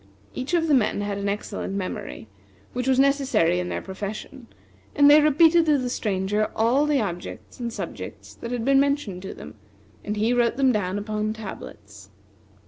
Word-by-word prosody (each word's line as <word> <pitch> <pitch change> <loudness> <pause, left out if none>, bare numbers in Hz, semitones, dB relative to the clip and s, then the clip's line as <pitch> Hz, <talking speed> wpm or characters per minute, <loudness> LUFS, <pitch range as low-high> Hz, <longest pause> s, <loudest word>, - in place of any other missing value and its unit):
Each 260 +7 -2
of 330 -1 +1
the 305 - +3
men 215 -5 +2
had 205 -1 -3
an 200 0 -1
excellent 200 -1 -4
memory, 185 - -5 0.5
which 250 +1 -3
was 260 -1 +3
necessary 270 - +3
in 180 0 -3
their - - -4
profession, 210 +6 -7 0.5
and 285 -1 +6
they 295 +1 +8
repeated 320 +3 +5
to 300 -2 +4
the 250 -2 -2
Stranger 205 -1 -1
all 250 +7 +2
the 295 -2 +2
objects 175 0 -6
and 235 -1 -3
subjects - - -7
that 235 - -8
had 240 -2 -2
been 275 0 +5
mentioned 280 -10 0
to 190 - -7
them, 75 - -10 0.5
and 210 +1 -3
he 220 +3 +2
wrote 240 0 +2
them 270 -2 +4
down 200 -4 -1
upon 215 +1 -2
tablets. 100 - -10
225 Hz, 180 wpm, -24 LUFS, 200-275 Hz, 0.5 s, they